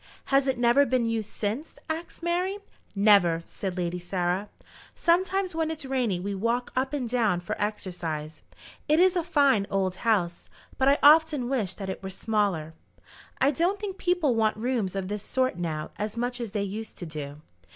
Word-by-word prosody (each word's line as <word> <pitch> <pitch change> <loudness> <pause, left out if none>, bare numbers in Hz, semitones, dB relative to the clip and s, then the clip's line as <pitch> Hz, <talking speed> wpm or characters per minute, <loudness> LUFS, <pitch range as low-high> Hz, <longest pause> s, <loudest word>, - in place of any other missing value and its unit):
"Has 275 0 +4
it 265 - +1
never 240 +4 +5
been 255 -3 +1
used 225 -2 -2
since?" 225 +9 -4
asked 330 +1 -5
Mary. 360 +3 0 0.4
"Never," 195 -5 +4
said 190 -2 -5
Lady 175 0 -2
Sarah. 180 +2 -1 0.5
"Sometimes 370 +2 +1
when 320 -1 0
it's 310 -3 -5
rainy 250 -8 0
we 200 +3 -3
walk 230 +5 -1
up 260 +1 0
and 280 -5 -2
down 225 -7 +1
for 175 - -4
exercise. 170 -7 -4 0.5
It 305 +2 +4
is 370 +1 +5
a 350 - +1
fine 275 - +3
old 190 -2 0
house, 185 -7 0 0.3
but 265 - +3
I 280 +1 +5
often 300 -3 +6
wish 225 -9 -1
that 195 - -6
it 190 - -5
were 190 - -5
smaller. 190 -6 -1 0.7
I 275 +2 +4
don't 350 +7 0
think 395 -2 -5
people 355 -7 +2
want 220 -1 +1
rooms 225 -5 -1
of 190 -1 -2
this 205 +1 -3
sort 255 -2 -1
now 155 -3 -3
as 210 +2 -4
much 245 +1 -2
as 235 - -3
they 205 -2 0
used 215 +3 -6
to 175 - -6
do. 150 -3 -6
225 Hz, 185 wpm, -27 LUFS, 190-280 Hz, 0.7 s, often